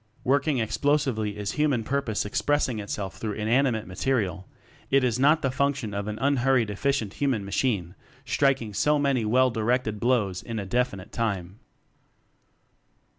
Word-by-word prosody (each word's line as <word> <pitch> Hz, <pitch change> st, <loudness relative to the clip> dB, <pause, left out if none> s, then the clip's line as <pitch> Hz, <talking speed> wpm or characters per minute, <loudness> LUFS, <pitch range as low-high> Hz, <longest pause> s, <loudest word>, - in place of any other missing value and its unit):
Working 140 Hz, +2 st, +2 dB
Explosively 110 Hz, -3 st, 0 dB
is 105 Hz, -1 st, -3 dB
human 145 Hz, -6 st, +1 dB
purpose 130 Hz, -5 st, -1 dB
expressing 130 Hz, +2 st, 0 dB
itself 100 Hz, -1 st, -5 dB
through 110 Hz, -2 st, -3 dB
inanimate 110 Hz, +2 st, +1 dB
material; 95 Hz, -1 st, -1 dB, 0.4 s
it 135 Hz, -1 st, +3 dB
is 125 Hz, -1 st, +1 dB
not 150 Hz, +4 st, +4 dB
the 135 Hz, -, +1 dB
function 135 Hz, -5 st, -1 dB
of 100 Hz, 0 st, -3 dB
an 105 Hz, 0 st, -4 dB
unhurried 130 Hz, -4 st, +2 dB
efficient 115 Hz, -1 st, -1 dB
human 130 Hz, -8 st, -1 dB
machine 100 Hz, -4 st, -1 dB, 0.3 s
striking 135 Hz, -6 st, +1 dB
so 150 Hz, +10 st, +2 dB
many 140 Hz, -5 st, +1 dB
well 130 Hz, +4 st, +3 dB
directed 115 Hz, -1 st, 0 dB
blows 105 Hz, -7 st, +1 dB
in 115 Hz, -1 st, -6 dB
a 100 Hz, -, -3 dB
definite 105 Hz, -3 st, -2 dB
time. 100 Hz, -4 st, -3 dB
120 Hz, 140 wpm, -26 LUFS, 105-135 Hz, 0.4 s, not